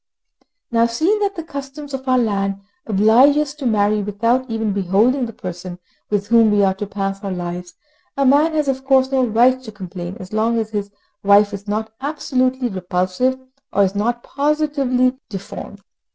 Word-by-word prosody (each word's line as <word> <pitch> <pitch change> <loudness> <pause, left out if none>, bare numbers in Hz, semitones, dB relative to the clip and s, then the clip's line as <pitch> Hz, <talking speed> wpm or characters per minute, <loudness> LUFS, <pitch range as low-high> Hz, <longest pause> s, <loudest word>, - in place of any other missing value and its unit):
Now, 230 0 +3
seeing 320 - +1
that 400 -1 -1
the 330 - -5
customs 280 -1 -8
of 265 0 -5
our 255 0 +3
land 200 -4 0 0.3
oblige 225 +7 +5
us 300 -2 0
to 285 -3 -4
marry 210 -1 +2
without 230 +6 0
ever 225 -1 -2
beholding 210 +6 +2
the - - -7
person 180 -3 -7 0.3
with 205 -1 0
whom 230 -1 +5
we 205 -1 +3
are 190 -1 +3
to 200 +2 -5
pass 195 0 -4
our 200 - -3
lives, 175 0 -5 0.4
a 275 - +2
man 290 +5 +4
has 305 -2 0
of 265 -1 -1
course 265 0 +3
no 265 -1 +2
right 245 +3 +3
to 235 -4 -9
complain 185 -2 -7
as 185 +2 -10
long 225 +2 +1
as 220 -1 -2
his 205 -1 -3 0.3
wife 205 +1 +5
is 200 +1 -7
not 220 +2 -3
absolutely 260 -3 0
repulsive, 185 +5 -1 0.3
or 200 - +3
is 190 0 +1
not 235 +4 -1
positively 275 -3 0
deformed. 200 0 -8
225 Hz, 180 wpm, -20 LUFS, 200-265 Hz, 0.4 s, oblige